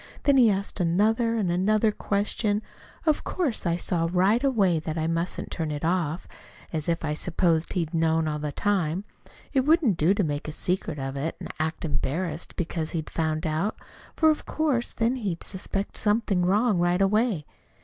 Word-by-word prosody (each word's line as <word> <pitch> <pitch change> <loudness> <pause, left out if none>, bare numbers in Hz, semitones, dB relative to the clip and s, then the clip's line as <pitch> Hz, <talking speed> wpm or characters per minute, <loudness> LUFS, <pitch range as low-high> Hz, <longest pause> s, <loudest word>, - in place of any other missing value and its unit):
Then 280 -1 +4
he 240 -4 +7
asked 200 0 -1
another 215 +7 +2
and 200 -6 0
another 215 +5 +2
question. 205 +1 0 0.4
Of 310 -2 +2
course, 280 - -1
I 170 0 +1
saw 165 -1 +1
right 195 +7 +3
away 200 - +3
that 160 +1 -4
I 160 - 0
must 165 +2 -1
turn 160 -3 -2
it 150 +1 -3
off 170 -1 0 0.5
as 155 0 -2
if 165 -1 0
I 150 - -1
supposed 165 0 0
he'd 170 -4 -2
known 160 -1 +2
it - - 0
all 150 - -3
the 150 0 -3
time. 185 0 0 0.5
It 270 - +4
wouldn't 280 - +3
do 170 +6 +3
to 200 - +1
make 145 -2 -2
a - - -3
secret 180 -2 -2
of 135 0 -4
it 150 +4 -2
and - - -7
act 160 +1 -2
embarrassed 160 +2 -3
because 165 -2 -3
he'd 155 - -5
found 155 -1 -1
it - - +1
out, 160 +8 -1 0.4
for 315 -1 +5
of 305 - -4
course 285 -7 0
then 235 +3 0
he'd 195 -8 -3
suspect 195 +1 -4
something 210 -4 +1
wrong 205 0 +3
right 175 +1 +2
away." 200 - +2
180 Hz, 190 wpm, -26 LUFS, 160-215 Hz, 0.5 s, he